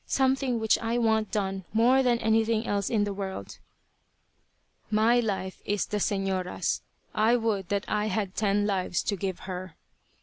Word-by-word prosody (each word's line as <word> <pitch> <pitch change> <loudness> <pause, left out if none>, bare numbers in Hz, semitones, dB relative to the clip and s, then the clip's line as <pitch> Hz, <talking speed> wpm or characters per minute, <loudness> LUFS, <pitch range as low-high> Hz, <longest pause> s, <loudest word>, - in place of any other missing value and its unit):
Something 265 -2 +1
which 220 -1 +3
I 230 +1 -1
want 220 -2 +2
done 195 -2 -2
more 245 +4 +5
than 245 -2 +3
anything 220 0 +1
else 200 -2 -1
in 215 -3 +2
the 205 -1 -2
world?" 190 - -6 1.3
"My 220 +3 +4
life 195 -5 -3
is 205 -2 0
the 210 - -3
señora's. 195 -2 -1 0.3
I 220 +2 +3
would 220 -6 -1
that 200 0 -1
I 210 0 0
had 200 -2 -2
ten 205 0 +1
lives 190 -3 0
to 205 - -1
give 190 -1 -4
her." 185 -1 -6
210 Hz, 160 wpm, -27 LUFS, 195-225 Hz, 1.3 s, more